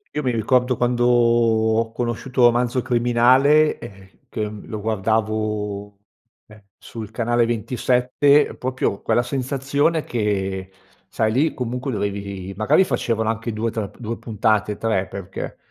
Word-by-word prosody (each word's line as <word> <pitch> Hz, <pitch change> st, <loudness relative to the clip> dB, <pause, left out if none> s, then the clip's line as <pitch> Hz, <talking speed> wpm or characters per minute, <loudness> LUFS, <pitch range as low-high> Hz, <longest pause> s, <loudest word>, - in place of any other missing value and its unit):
Io 150 Hz, -, -1 dB
mi 125 Hz, -, +1 dB
ricordo, 125 Hz, +2 st, +1 dB
quando 120 Hz, 0 st, +1 dB
ho 115 Hz, -2 st, +3 dB
conosciuto 120 Hz, +2 st, -2 dB
Romanzo 120 Hz, +1 st, +2 dB
Criminale, 125 Hz, +5 st, +3 dB
ehm, 95 Hz, -1 st, -12 dB, 0.2 s
che, 105 Hz, -2 st, -3 dB
mhmm, 105 Hz, -1 st, -10 dB
lo 110 Hz, -, -5 dB
guardavo, 105 Hz, -1 st, -2 dB, 0.5 s
ehm, 105 Hz, -1 st, -17 dB
sul 110 Hz, -2 st, -9 dB
canale 120 Hz, +1 st, +1 dB
27, 125 Hz, +5 st, +2 dB
proprio 125 Hz, -5 st, -2 dB
quella 120 Hz, -, +2 dB
sensazione 140 Hz, +5 st, -1 dB
che 95 Hz, -4 st, -2 dB, 0.4 s
sai, 110 Hz, 0 st, 0 dB
lì 150 Hz, +6 st, +2 dB
comunque 125 Hz, +2 st, -3 dB
dovevi 100 Hz, -3 st, -4 dB
magari 110 Hz, -, +3 dB
facevano 115 Hz, -5 st, -1 dB
anche 115 Hz, +1 st, -2 dB
2 110 Hz, +1 st, -2 dB
tr 110 Hz, -3 st, -4 dB
2 115 Hz, 0 st, -4 dB
puntate, 105 Hz, -1 st, 0 dB
3, 100 Hz, -4 st, 0 dB
perché 95 Hz, 0 st, -7 dB
115 Hz, 130 wpm, -21 LUFS, 105-125 Hz, 0.5 s, ho